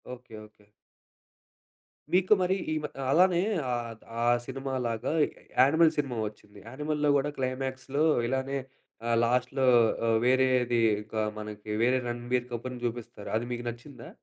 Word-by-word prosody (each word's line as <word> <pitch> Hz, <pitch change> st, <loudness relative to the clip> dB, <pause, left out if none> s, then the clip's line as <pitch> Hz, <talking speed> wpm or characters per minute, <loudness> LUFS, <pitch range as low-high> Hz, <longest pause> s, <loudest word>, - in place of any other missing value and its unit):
Okay. 125 Hz, -2 st, -14 dB
Okay. 105 Hz, -1 st, -23 dB, 1.4 s
మీకు 185 Hz, +3 st, +5 dB
మరి 185 Hz, +1 st, +2 dB, 0.2 s
ఈ -, -, +1 dB
మ -, -, -1 dB, 0.2 s
ఆహ్, 130 Hz, -, -2 dB
అలానే 180 Hz, +3 st, +4 dB, 0.3 s
ఆహ్, 120 Hz, -1 st, -2 dB, 0.3 s
ఆ -, -, +1 dB, 0.2 s
సినిమాలాగ 130 Hz, -4 st, -3 dB, 0.6 s
యానిమల్‌ 160 Hz, +5 st, +6 dB
సినిమా 135 Hz, -5 st, -1 dB
వచ్చింది. 105 Hz, -1 st, -13 dB
యానిమల్‌లో 150 Hz, +4 st, -1 dB
కూడా 140 Hz, +1 st, 0 dB
క్లైమాక్స్‌లో 130 Hz, +2 st, -2 dB, 0.2 s
ఇలానే 135 Hz, +2 st, -1 dB, 0.5 s
ఆహ్, 115 Hz, -, +3 dB
లాస్ట్‌లో 125 Hz, +2 st, +1 dB, 0.4 s
ఆహ్, 115 Hz, 0 st, +4 dB
వేరేది 125 Hz, -2 st, +3 dB, 0.2 s
ఒక 110 Hz, +1 st, -12 dB, 0.2 s
మనకి 105 Hz, 0 st, -8 dB
వేరే 130 Hz, +2 st, +3 dB
రణబీర్ 120 Hz, +1 st, -2 dB
కపూర్‌ని 125 Hz, +1 st, -5 dB
చూపిస్తారు. 115 Hz, -3 st, -5 dB
అది 115 Hz, -, -3 dB
మీకు 120 Hz, 0 st, -4 dB
నచ్చిందా? 120 Hz, +1 st, -10 dB
125 Hz, 130 wpm, -28 LUFS, 120-135 Hz, 1.4 s, యానిమల్‌